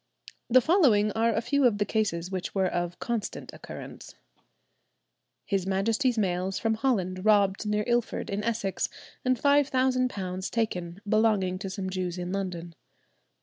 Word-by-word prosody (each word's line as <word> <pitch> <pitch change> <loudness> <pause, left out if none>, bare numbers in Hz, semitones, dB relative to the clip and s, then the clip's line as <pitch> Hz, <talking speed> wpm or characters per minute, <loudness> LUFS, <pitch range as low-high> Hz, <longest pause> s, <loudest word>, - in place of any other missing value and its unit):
The 255 +2 +6
following 245 - +4
are 225 +2 +1
a 225 - 0
few 260 +3 +3
of 215 -4 0
the 205 - +1
cases 195 -5 -1
which 185 0 -4
were 190 -1 +2
of 175 -1 -2
constant 235 -1 -4
occurrence. - - -10 1.3
"His 195 -2 -1
Majesty's 225 +6 +1
mails 185 -1 0
from 225 -1 +1
Holland 190 -7 -1
robbed 205 -1 +3
near 210 0 +1
Ilford 240 -3 -1
in 200 +1 -2
Essex, 220 -4 -1 0.3
and 255 0 +2
£5,000 255 -9 +1
taken, 180 -5 -2
belonging 205 -4 +2
to 195 -1 -5
some 190 -1 -4
Jews 185 -1 -3
in 180 0 -4
London." 180 -3 -4
205 Hz, 145 wpm, -27 LUFS, 185-230 Hz, 1.3 s, The